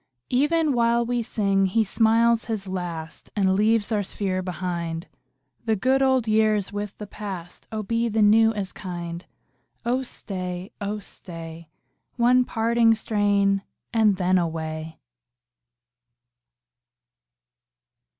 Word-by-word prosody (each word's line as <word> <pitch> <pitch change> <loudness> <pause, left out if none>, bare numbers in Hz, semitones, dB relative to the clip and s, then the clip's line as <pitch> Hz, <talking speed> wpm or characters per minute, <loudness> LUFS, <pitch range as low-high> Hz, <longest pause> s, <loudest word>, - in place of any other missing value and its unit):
37 250 +1 +3 0.2
Even 310 -3 +2
while 235 0 +2
we 245 0 0
sing 195 -4 +1
he 220 +4 +2
smiles 230 +2 +3
his 215 -4 -3
last 170 -4 -5
And 190 -2 +3
leaves 215 +2 +2
our 210 -2 +2
sphere 190 -1 -2
behind. 175 -2 -4 0.6
The 220 -1 +2
good 260 +7 +2
old 260 -3 +3
year 215 0 +4
is 205 -1 -3
with 205 -1 -5
the 210 - -6
past; 195 -4 -8
Oh 215 -1 -3
be 230 +2 0
the 220 0 +2
new 225 +2 +6
as 200 -3 -3
kind! 175 -2 -6 0.6
Oh 245 +2 +1
staj, 185 -7 -5
oh 205 +1 -2
stay, 165 -5 -8 0.5
One 250 +1 +4
parting 230 0 +3
strain, 205 -2 +1 0.3
and 220 -3 +4
then 185 0 +2
away. 160 -1 -4
205 Hz, 125 wpm, -24 LUFS, 185-225 Hz, 0.6 s, new